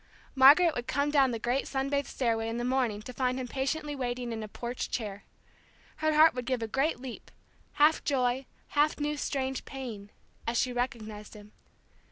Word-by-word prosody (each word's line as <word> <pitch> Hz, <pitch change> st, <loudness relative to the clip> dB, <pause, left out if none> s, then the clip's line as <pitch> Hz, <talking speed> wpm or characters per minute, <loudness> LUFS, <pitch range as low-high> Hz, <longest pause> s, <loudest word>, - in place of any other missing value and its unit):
Margaret 290 Hz, +6 st, +7 dB
would 245 Hz, -2 st, -4 dB
come 285 Hz, +2 st, 0 dB
down 275 Hz, -3 st, +4 dB
the 235 Hz, -, -2 dB
great 245 Hz, +4 st, -1 dB
sun 270 Hz, 0 st, -1 dB
bathed 280 Hz, 0 st, 0 dB
stairway 225 Hz, -3 st, -1 dB
in 230 Hz, -, -3 dB
the 240 Hz, -, -2 dB
morning 245 Hz, -5 st, 0 dB
to 250 Hz, -, -8 dB
find 255 Hz, 0 st, 0 dB
him 255 Hz, -, -4 dB
patiently 290 Hz, +3 st, -2 dB
waiting 245 Hz, -2 st, -3 dB
in 220 Hz, -, -4 dB
a 215 Hz, -, -5 dB
porch 240 Hz, +3 st, -5 dB
chair. 205 Hz, -4 st, -4 dB, 0.7 s
Her 310 Hz, 0 st, +1 dB
heart 315 Hz, +1 st, +7 dB
would 250 Hz, -1 st, -5 dB
give 255 Hz, -3 st, 0 dB
a -, -, -2 dB
great 270 Hz, +5 st, 0 dB
leap 255 Hz, -2 st, -8 dB, 0.4 s
half 300 Hz, +2 st, +4 dB
joy, 260 Hz, -2 st, 0 dB, 0.2 s
half 300 Hz, +1 st, +2 dB
new 295 Hz, 0 st, -1 dB
strange 265 Hz, -2 st, -2 dB
pain, 235 Hz, -7 st, -7 dB, 0.4 s
as 235 Hz, +1 st, 0 dB
she 250 Hz, +1 st, +1 dB
recognized 220 Hz, -4 st, -4 dB
him. 210 Hz, 0 st, -13 dB
255 Hz, 190 wpm, -29 LUFS, 235-280 Hz, 0.7 s, Margaret